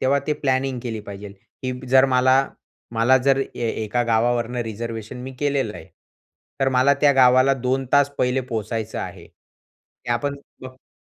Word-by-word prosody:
तेव्हा 140 +2 +2
ते 150 - +1
प्लॅनिंग 130 -1 0
केली 115 -3 -4
पाहिजे, 100 0 -8 0.3
की 130 0 -2 0.2
जर 130 +1 +6
मला 130 +1 +4 0.6
मला 115 +4 +4
जर, 135 +1 +2 0.2
ए 120 -1 -2 0.2
एका 120 +3 0
गावावरनं 120 +1 +1
रिझर्वेशन 115 +1 -6
मी 130 - -7
केलेलं 140 -7 -1
आहे. 80 - -11 0.7
तर 135 - +3
मला 140 +3 +4
त्या 145 -1 +5
गावाला 130 +1 +5
2 130 +1 -1
तास 145 0 +4
पहिले 125 +1 +1
पोहचायचं 110 0 -3
आहे. - - -7
त्या 120 0 -8
पण 140 +3 -3 0.3
ब - - -6
हो. 130 0 -19
125 Hz, 160 wpm, -22 LUFS, 115-135 Hz, 0.7 s, जर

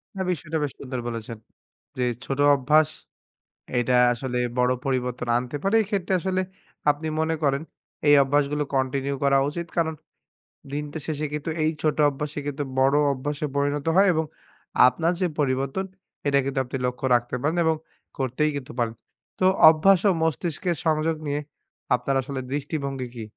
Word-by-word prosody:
না 190 - -3
বিষয়টা 160 -2 -3
বেশ 140 - -2
সুন্দর 130 -2 -5
বলেছেন। 115 -1 -5 0.6
যে 130 - -3
এই - - -1
ছোট 135 - -3 0.2
অভ্যাস 150 +3 +3 0.9
এইটা 125 +1 +2 0.2
আসলে 125 +1 -4 0.2
বড় 125 0 +3
পরিবর্তন 125 -2 -1
আনতে 125 +4 -3
পারে, 195 +3 +2
এই - - -2
ক্ষেত্রে 195 -3 -1
আসলে 185 0 0 0.5
আপনি 150 +2 -6
মনে 160 +1 +1
করেন, 140 +1 +2 0.5
এই 145 - +7
অভ্যাসগুলো 145 +1 +1
কন্টিনিউ 135 +1 0
করা 140 0 +4
উচিত। 170 +2 -5
কারণ 160 -1 +1 0.8
দিনটা 150 +1 -4
শেষে 155 -1 -2
কিন্তু 150 +2 -3
এই 155 - +2
ছোট 155 -1 +1
অভ্যাসই 145 +1 -5
কিন্তু 145 0 -2 0.2
বড় 135 +2 +4 0.2
অভ্যাসে 145 +3 -3
পরিণত 145 +1 0
হয় 195 +1 +6
এবং 160 0 0 0.6
আপনার 165 +6 +1
যে 180 - +3
পরিবর্তন, 135 +6 0 0.4
এটা 140 0 +3
কিন্তু 135 -1 -1
আপনি 135 - -4
লক্ষ্য 125 +1 -2
রাখতে 120 +1 -1
পারেন 155 +4 0
এবং 160 0 +3 0.4
করতেই 135 +3 0
কিন্তু 135 -2 -6
পারেন। 115 -1 0 0.4
তো 185 - +2 0.2
অভ্যাস 175 +4 +5
ও - - +5
মস্তিষ্কের 165 +1 -1
সংযোগ 160 0 +2
নিয়ে 145 +1 -1 0.6
আপনার 135 +2 -1
আসলে 135 0 -5
দৃষ্টিভঙ্গি 140 -3 -3
কি? 115 - -5
145 Hz, 160 wpm, -25 LUFS, 130-160 Hz, 0.9 s, এই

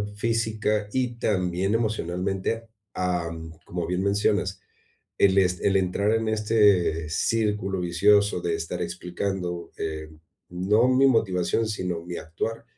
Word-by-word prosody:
física 110 -1 0
y 125 -1 -1
también 95 -2 0
emocionalmente, 100 0 -2 0.3
am, 85 -3 -2
como 85 -1 -3
bien 90 +1 -1
mencionas, 100 -1 +1 0.6
el 100 -1 +4
est 90 -1 +1
el 100 - +3
entrar 95 +3 +1
en 115 0 0
este 105 -8 +2
círculo 105 +1 0
vicioso 100 +3 +3
de 85 -1 -1
estar 85 - -4
explicando, 90 -1 -4
eh, 80 -1 -4 0.4
no 100 +7 +2
mi 130 +1 +5
motivación, 110 -2 +1
sino 90 -5 -2
mi 90 -1 -5
actuar, 110 +8 -4
95 Hz, 120 wpm, -25 LUFS, 90-110 Hz, 0.6 s, mi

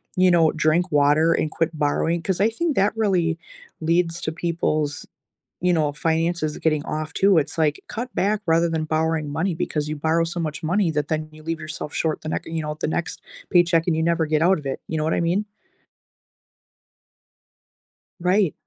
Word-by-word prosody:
you 185 0 +4
know, 165 -2 +4
drink 160 +4 +2
water 150 +3 +4
and 155 - -1
quit 165 +1 0
borrowing 160 +3 0
'cause 185 +1 -1
I 215 - +4
think 310 +6 -1
that 200 +3 +2
really 180 -7 +1 0.4
leads 165 +1 +1
to 155 - -2
people's, 160 -3 -1 0.6
you 180 0 +3
know, 150 -3 +1
finances 165 0 0
getting 155 -2 0
off 155 0 -4
too. 195 -2 +4
It's 150 0 0
like, 150 -2 +1
cut 245 +3 -5
back 210 +2 +1
rather 165 +1 +3
than 160 -1 -1
borrowing 160 -1 0
money 165 +6 -1
because 150 -3 -2
you 155 - -2
borrow 160 +3 +1
so 170 +1 -4
much 155 -1 -4
money 175 +2 +1
that 150 -1 -1
then 155 0 -2
you 155 0 -15
leave 165 0 -3
yourself 155 -1 -6
short 160 -1 -1
the - - -7
nex - - -3
or - - -8
you 165 -1 -2
know, 150 0 -4
the - - 0
next 165 +2 -3 0.3
paycheck, 170 -2 +4
and 170 - +2
you 160 - 0
never 170 -1 +2
get 155 0 +1
out 180 +1 +4
of 145 - -13
it. 135 - -3
You 160 - -2
know 155 - 0
what 160 - +1
I - - +1
mean? 180 +5 +1 2.7
Right. 180 -1 +2
165 Hz, 200 wpm, -23 LUFS, 155-175 Hz, 2.7 s, you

